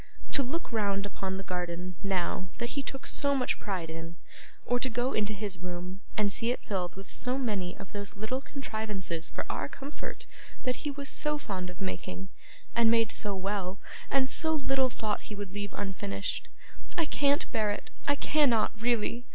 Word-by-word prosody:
To 280 - +6
look 275 +5 -2
round 200 -3 +2
upon 190 -1 -2
the 195 - -3
garden, 180 0 -2
now, 185 -1 +1
that 235 0 -1
he 280 - 0
took 270 0 -5
so 280 -1 +3
much 255 -2 +2
pride 180 -5 -2
in, 165 +1 -5 0.5
or 245 0 +3
to 260 - +2
go 245 +3 +1
into 210 0 +2
his 200 -3 -1
room 180 +2 -4 0.2
and 210 -2 +4
see 230 +4 +1
it 245 - 0
filled 180 -4 -1
with 195 0 -9
so 255 +1 0
many 205 -9 0
of 195 - -8
those 200 0 -4
little 220 +6 -1
contrivances 210 - -2
for - - -3
our - - -1
comfort 280 +3 -6 0.4
that 250 -1 +1
he 300 - -2
was 280 0 -3
so 300 0 +2
fond 190 -10 -3
of 180 - -9
making, 190 0 -3 0.5
and 235 -1 +6
made 225 -1 +5
so 205 -2 0
well, 190 0 -1 0.3
and 270 -1 +4
so 320 +3 +2
little 270 -2 +3
thought 215 -3 -1
he 210 - -4
would 200 -2 -5
leave 205 0 -2
unfinished 200 +1 -2 0.5
I 335 - +4
can't 285 -1 +3
bear 215 -1 +3
it, 205 - -3 0.2
I 285 - +5
cannot 280 -7 +4
really. 240 +1 +2
210 Hz, 185 wpm, -31 LUFS, 190-255 Hz, 0.5 s, To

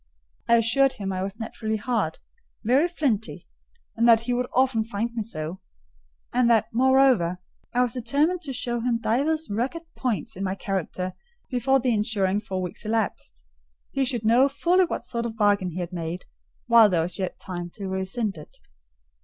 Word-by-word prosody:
I 235 - +7
assured 260 +4 +3
him 200 -6 -4
I 185 - -2
was 195 +3 -5
naturally 220 -1 -3
hard—very 245 - -1
flinty, 265 - -2 0.5
and 230 +1 +3
that 225 -1 +7
he 245 +1 -2
would 250 +1 0
often 255 -3 +2
find 230 +1 -3
me 235 - -2
so; 175 -4 -5 0.7
and 245 -1 +3
that, 225 -2 +4
moreover, 255 -8 +4 0.3
I 250 +1 +3
was 245 -2 -1
determined 285 +9 +1
to 285 - -5
show 240 -2 -2
him 235 0 0
divers 290 +8 0
rugged 255 +10 -2
points 235 -2 -2
in 190 - -4
my 190 0 -1
character 185 -1 -3 0.4
before 265 +2 +2
the 250 -1 +1
ensuing 205 -2 +1
four 190 -4 -4
weeks 180 - -6
elapsed: 215 - -2 0.5
he 275 - 0
should 245 -4 0
know 245 +5 +5
fully 350 +6 +3
what - - -4
sort 235 -1 -2
of 225 - -6
a - - -21
bargain 205 -3 +2
he 180 +2 -5
had 175 +1 -5
made, 170 +1 -4 0.4
while 230 -2 +7
there 170 -4 +2
was 175 +2 -4
yet 185 -2 -3
time 175 -2 -5
to 200 -3 -5
rescind 190 +2 -2
it. 150 - -13
225 Hz, 180 wpm, -25 LUFS, 195-250 Hz, 0.7 s, I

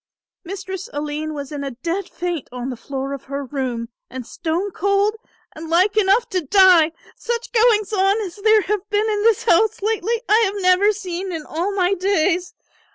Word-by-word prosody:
"Mistress 380 +2 -6
Aline 300 +1 -4
was 280 -1 -6
in 290 -1 -4
a 275 - -3
dead 330 +10 -4
faint 345 -5 -4
on 250 +1 -5
the - - -5
floor 270 +3 -5
of 275 - -8
her 280 +1 -4
room 250 -4 -3 0.2
and 255 -1 -7
stone 340 - -3
cold 400 +4 +1 0.4
and 320 +1 -8
like 370 +5 +3
enough 425 +3 +3
to 370 -3 -1
die. 345 0 +5 0.2
Such 475 0 -4
goings 445 -3 +3
on 395 +1 +2
as 375 -3 -6
there 435 +1 +4
have 415 0 -3
been 420 +1 +1
in 420 -1 0
this 450 -1 +3
house 435 +6 +3
lately 450 +2 -1
I 430 +2 +5
have 400 +1 -3
never 370 +2 +4
seen 380 -2 -5
in 320 -3 -5
all 345 +6 -2
my 370 0 +2
days. 365 -2 0
370 Hz, 185 wpm, -21 LUFS, 310-410 Hz, 0.4 s, die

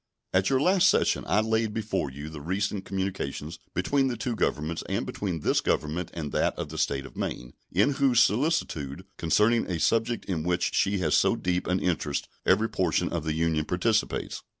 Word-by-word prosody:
At 95 +1 +3
your 135 - +3
last 185 +5 +4
session - - +2
I 105 - +3
laid 110 -1 0
before 110 -9 -1
you 70 +3 -8
the 80 -2 -8
recent 95 +4 -2
communications 90 -5 -4 0.2
between 135 +10 +2
the 125 -2 -2
two 120 +1 -2
Governments 80 -5 -1
and - - -1
between 90 -6 -3
this - - +2
Government 80 +3 -1
and 75 -4 -4
that - - 0
of - - -4
the - - -5
State 70 -1 0
of - - -12
Maine, - - -4 0.2
in 100 +10 +3
whose 135 -4 +3
solicitude 105 - +1
concerning 105 +8 +3
a 85 -2 -1
subject 115 +5 +1
in 85 -5 -2
which 90 +1 0
she 100 +1 +2
has 80 -5 0
so - - +4
deep 90 0 -1
an 90 +1 +1
interest 80 -5 -1 0.2
every 110 - +4
portion 90 -3 0
of 85 -2 -3
the 80 - 0
Union 80 -1 +1
participates. 105 +7 0
90 Hz, 190 wpm, -27 LUFS, 80-110 Hz, 0.2 s, last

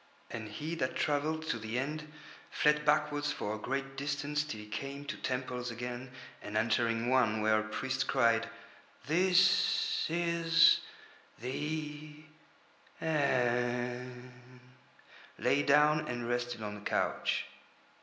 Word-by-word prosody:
And 110 -2 -5
he 150 +10 -5
that 140 -6 -2
travelled 155 +2 0
to 115 - 0
the 110 +2 -4
End 150 +3 -3 0.4
fled 150 -1 +2
backwards 150 -1 +2
for 105 -7 -3
a 110 - -5
great 135 +3 -3
distance 145 +1 -1
till 145 -8 -6
he 105 - -9
came 140 +6 -6
to - - -4
temples 125 -1 -3
again, 120 +2 -5 0.3
and 105 - -4
entering 115 +1 +1
one 120 -4 +3
where 110 0 +4
a - - -2
priest 130 +4 -2
cried: 115 -3 +2 0.6
"This 180 +4 +3
is 165 0 +4 0.6
the 150 +4 -4 0.8
End," 125 -4 0 1.1
lay 145 - +2
down 150 +2 +4
and 120 -1 -3
rested 120 -2 -2
on 105 0 -5
a - - -11
couch. - - 0
130 Hz, 125 wpm, -32 LUFS, 120-150 Hz, 1.1 s, where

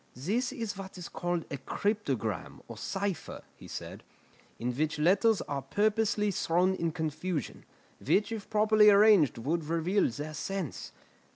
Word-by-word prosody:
"This 210 - -1
is 230 -6 -4
what 195 -1 -8
is 180 - -7
called 175 -1 -2
a 140 - -3
cryptogram, 140 - -2
or - - -8
cipher," 195 -2 -4
he - - -13
said, - - -7 0.6
"in 120 +1 -3
which 155 +3 -1
letters 195 +7 +3
are 140 -1 -3
purposely 210 - +1
thrown 180 +1 +2
in 170 -3 -1
confusion, 160 -1 -4 0.4
which 200 - +2
if 220 -3 -5
properly 215 0 +5
arranged 200 - +6
would 155 +7 -1
reveal 170 +5 +1
their 150 +6 -6
sense. 180 +1 -4
180 Hz, 145 wpm, -30 LUFS, 155-210 Hz, 0.6 s, arranged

